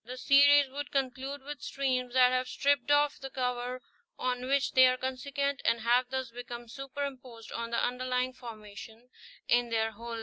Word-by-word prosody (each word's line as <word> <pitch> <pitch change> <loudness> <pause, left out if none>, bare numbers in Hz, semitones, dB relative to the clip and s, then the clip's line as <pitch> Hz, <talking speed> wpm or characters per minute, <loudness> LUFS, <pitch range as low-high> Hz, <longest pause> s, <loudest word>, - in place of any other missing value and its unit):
The 250 +3 -8
series 285 +2 +6
would 285 +1 -5
conclude 270 +1 -3
with 290 +1 -7
streams 255 -2 -2
that 250 -1 +6
have 255 0 0
stripped 285 +2 +1
off 290 0 +3
the 270 - -7
cover 250 -1 -3 0.3
on 250 0 -2
which 275 +1 +1
they 260 -1 +7
were 255 - 0
consequent, 275 +2 -2
and 230 0 +2
have 245 +2 +2
thus 260 -2 -3
become 240 0 -8
superimposed 260 -3 -7
on 230 0 -4
the 235 - -1
underlying 250 +1 -1
formation 225 0 -11 0.4
in 240 0 +3
their 225 -1 0
whole 230 +2 -8
length. 230 - -4
255 Hz, 175 wpm, -30 LUFS, 240-275 Hz, 0.4 s, they